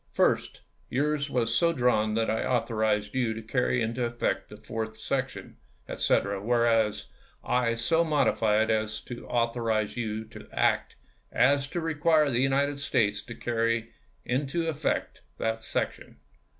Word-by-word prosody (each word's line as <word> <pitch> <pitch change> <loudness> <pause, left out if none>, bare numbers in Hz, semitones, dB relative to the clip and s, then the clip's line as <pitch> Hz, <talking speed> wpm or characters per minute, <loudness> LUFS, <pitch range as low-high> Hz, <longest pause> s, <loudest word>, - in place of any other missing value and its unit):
First, - - +1 0.3
yours 145 +2 0
was 115 -3 0
so 170 +6 +3
drawn 120 -6 +2
as - - -1
that - - -1
I - - -1
authorized 110 -4 0
you 120 -4 0
to 110 - -6
carry 125 +1 +1
into 115 +2 -2
effect 120 0 -1
the - - -10
fourth 110 0 -5
section, 135 +1 -3 0.3
etc.; 100 0 +1
whereas 115 -2 +2 0.4
I 120 -2 +1
so 160 +9 +2
modify 115 -9 +2
it 110 - 0
as 110 0 -1
to 120 -1 -9
authorize 115 -2 0
you 110 -2 -3
to 110 0 -12
so - - -25
act - - +1 0.4
as 140 +1 +3
to 160 +4 -3
require 155 -2 +2
the 120 - +1
United 140 +1 +1
States 110 -7 +1
to 115 - -9
carry 115 -1 -1 0.3
into 140 +6 -1
effect 155 -1 -2 0.2
that 110 0 -1
section. - - -3
120 Hz, 150 wpm, -28 LUFS, 110-140 Hz, 0.4 s, so